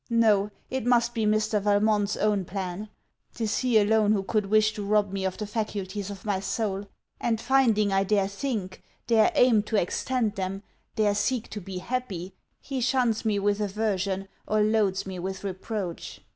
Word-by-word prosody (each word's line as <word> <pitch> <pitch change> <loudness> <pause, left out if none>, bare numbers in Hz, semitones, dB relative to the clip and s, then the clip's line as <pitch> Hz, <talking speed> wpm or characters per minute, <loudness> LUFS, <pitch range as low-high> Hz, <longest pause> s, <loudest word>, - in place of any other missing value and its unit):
No: 215 -3 +3 0.2
it 265 -2 -1
must 240 0 +3
be 225 -3 0
Mr. 215 0 +1
Valmont's 205 0 +2
own 210 -2 +1
plan; 190 +2 -5 0.5
'tis 220 -2 -1
he 250 -3 +3
alone 215 0 +4
who 200 -2 0
could 210 0 0
wish 215 +1 +3
to 210 - -5
rob 205 -1 +2
me 195 -1 -2
of 190 - -2
the 215 - -3
faculties 205 -2 -3
of 200 -1 -9
my 200 -3 0
soul; 200 -1 -2 0.3
and, 225 -2 0
finding 230 -5 +3
I 195 0 +3
dare 195 -1 +2
think, 200 -3 -4 0.2
dare 230 +6 +4
aim 245 -6 +5
to 220 +2 -4
extend 225 +4 -1
them, 195 0 -4 0.3
dare 210 -2 +2
seek 230 +3 -1
to 210 - -5
be 190 0 -7
happy, 190 -4 -4 0.3
he 270 -2 -4
shuns 240 -2 +1
me 215 -2 +2
with 205 +1 +1
aversion 195 -2 -1 0.2
or 215 0 +2
loads 210 -3 +2
me 190 -2 -6
with 190 +2 -5
reproach. 190 -1 -5
210 Hz, 175 wpm, -27 LUFS, 195-220 Hz, 0.5 s, aim